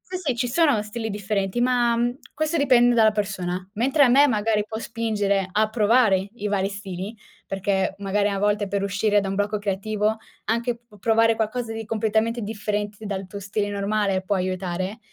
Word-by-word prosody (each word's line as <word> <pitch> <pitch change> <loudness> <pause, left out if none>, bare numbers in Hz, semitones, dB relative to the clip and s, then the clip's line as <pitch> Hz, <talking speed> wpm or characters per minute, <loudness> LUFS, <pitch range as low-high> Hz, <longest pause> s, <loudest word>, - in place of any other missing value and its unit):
Sì, 370 - -7
sì, 300 -8 -1
ci 245 +1 -1
sono 285 -4 +3
stili 220 +2 -5
differenti, 200 0 -2
ma, 240 -1 +3
mhmm, 240 +1 0 0.2
questo 310 +2 -1
dipende 245 -5 +4
dalla 220 -1 +5
persona. 185 -3 -3
Mentre 265 +7 +2
a 270 - +7
me 275 +4 +6
magari 215 -3 +1
può 220 0 -5
spingere 210 -4 -1
a 215 +2 +2
provare 215 -3 +3
i 210 -3 -4
vari 195 -1 0
stili, 200 +1 -6 0.3
perché 195 0 -1
magari 200 +1 0
a 200 -1 -2
volte 205 0 +1
per 200 0 -2
uscire 205 +1 +2
da 195 - -3
un 195 - -2
blocco 205 +1 0
creativo 210 +2 -1 0.3
anche 235 +2 0
p - - -30
p 210 -3 -17
provare 225 +2 +3
qualcosa 225 +1 -2
di 225 0 -5
completamente 220 +2 0
differente 210 0 -3
dal 195 -1 -4
tuo 200 - -7
stile 205 +1 -2
normale 200 -1 0
può 200 +2 -1
aiutare, 185 +2 -2
210 Hz, 185 wpm, -24 LUFS, 200-230 Hz, 0.3 s, a